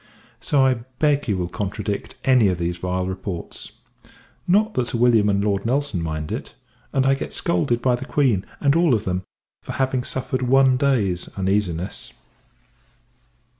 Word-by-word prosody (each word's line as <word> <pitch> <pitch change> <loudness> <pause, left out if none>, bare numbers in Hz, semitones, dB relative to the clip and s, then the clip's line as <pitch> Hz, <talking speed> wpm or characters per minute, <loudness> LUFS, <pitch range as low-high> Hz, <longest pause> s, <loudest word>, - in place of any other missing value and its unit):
So 140 -3 +2
I 130 - +4 0.2
beg 145 -2 +2
you 100 -4 +1
will 90 -1 -2
contradict 105 0 -4
any 125 -5 +5
of 90 -2 0
these 85 0 -2
vile 90 +1 -1
reports. 95 -2 -6 0.7
Not 210 +4 +3
that 125 -8 0
Sir 120 - -1
W. 115 -3 +4
and 100 0 +1
Lord 100 +1 0
N. 140 -8 0
mind 80 -2 -4
it; - - -5 0.4
and 135 -1 +1
I 135 - +4
get 135 - -4
scolded 130 -8 0
by 125 - +3
the 120 +2 -3
Queen, 130 -10 +1 0.2
and 140 +1 +3
all 165 -6 +4
of 110 0 -3
them, 90 -1 -1 0.4
for - - -7
having 130 -1 0
suffered 130 0 -3
one 130 +1 +4
day's 115 -10 +1
uneasiness. 95 -2 -1
115 Hz, 165 wpm, -22 LUFS, 95-135 Hz, 0.7 s, any